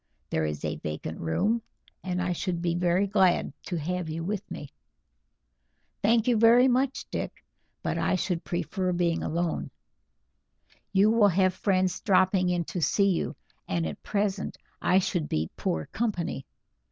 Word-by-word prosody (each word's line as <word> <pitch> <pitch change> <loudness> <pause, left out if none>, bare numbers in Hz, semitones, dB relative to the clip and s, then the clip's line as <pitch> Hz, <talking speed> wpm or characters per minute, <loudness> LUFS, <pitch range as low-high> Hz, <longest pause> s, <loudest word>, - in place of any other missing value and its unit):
There 80 - +1
is 75 -1 -3
a - - -2
vacant 75 +1 -5
room, 205 - +1 0.4
and 180 -1 -1
I 180 0 0
should 175 0 -2
be 170 -1 0
very 175 +2 +2
glad 190 -7 +2
to 180 - -2
have 175 +2 -2
you 165 +1 -3
with 200 +3 -3
me." 145 - -7 1.3
"Thank 225 +2 +3
you 240 -2 +4
very 235 +3 +6
much, 260 +1 +1
Dick, - - -5 0.4
but - - -1
I - - +2
should 180 -2 -1
prefer 180 +2 -2
being 170 -1 +1
alone. 170 +1 -1 1.2
You 200 +2 +5
will 225 -2 +5
have 185 0 +3
friends 185 -1 +1
dropping 185 -1 +3
in 175 -1 +1
to 175 +2 -4
see 195 +4 +3
you, 175 - -1 0.3
and 85 -2 0
at 80 -2 -5
present 200 -1 -1 0.2
I 185 - +4
should 180 -4 0
be 80 +1 -1
poor 80 -1 -2
company. 195 - -2
180 Hz, 155 wpm, -28 LUFS, 170-200 Hz, 1.3 s, very